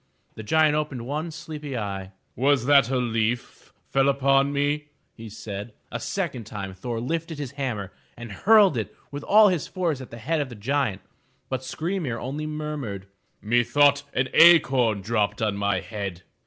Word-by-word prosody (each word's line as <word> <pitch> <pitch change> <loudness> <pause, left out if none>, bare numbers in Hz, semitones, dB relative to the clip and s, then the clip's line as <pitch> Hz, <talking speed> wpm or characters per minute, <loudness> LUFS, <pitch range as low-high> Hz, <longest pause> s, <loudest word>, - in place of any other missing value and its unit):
The - - -8
giant 155 +7 +3
opened 150 -6 -2
one 150 +5 -3
sleepy 150 -4 -6
eye. 95 -3 -4 0.2
'*Was 135 0 +2
that 140 -3 +5
a 130 - +1
leaf 120 -1 -2 0.2
fell 135 0 +3
on 140 0 +3
me?'* 145 +1 0 0.4
said 105 -1 -6
he. 115 - -22 0.2
A - - -3
second 120 -4 -3
time 100 -2 -6
Thor 115 +5 -4
lifted 165 +5 -3
his 145 -3 -5
hammer 120 -9 -4 0.2
and 120 -2 -8
hurled 200 - +5
it 110 -3 -4 0.2
with 145 0 -5
all 210 +6 +6
his 175 -6 -1
force 165 -7 -2
at 130 - -10
the 115 - -9
head 150 +7 -1
of 140 - -4
the 120 - -9
giant. 120 -1 -1 0.5
But 130 -1 -2
Skry 165 +8 -3
'mir 125 -7 -3
only 145 +6 -4
murmured: 150 -11 -5 0.3
"Methought 120 +6 +3
an 130 +1 +1
acorn 130 - +6
dropped 105 -1 0
on 105 -2 0
my 100 -2 0
head. 100 -3 -6
130 Hz, 170 wpm, -25 LUFS, 110-150 Hz, 0.5 s, all